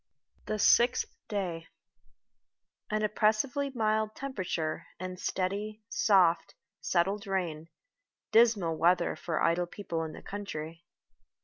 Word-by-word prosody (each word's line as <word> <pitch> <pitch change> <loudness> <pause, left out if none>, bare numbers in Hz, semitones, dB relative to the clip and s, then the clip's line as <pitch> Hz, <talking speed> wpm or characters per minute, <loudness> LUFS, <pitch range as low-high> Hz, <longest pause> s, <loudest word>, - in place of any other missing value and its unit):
THE 215 - -1
SIXTH 240 - +4 0.2
DAY 180 -6 -3 1.2
AN 215 0 0
oppressively 220 +7 +1
mild 220 -3 0
temperature, 185 -12 -3
and 185 0 -6
steady, 205 +4 -2
soft, 185 -7 +3 0.3
settled 195 +4 0
rain 170 -5 -2 0.6
dismal 215 -8 +4
weather 175 +1 +3
for 165 -2 -2
idle 175 +1 +2
people 170 -4 -4
in 160 -1 -6
the - - -11
country. 165 -5 -6
195 Hz, 105 wpm, -30 LUFS, 170-215 Hz, 1.2 s, SIXTH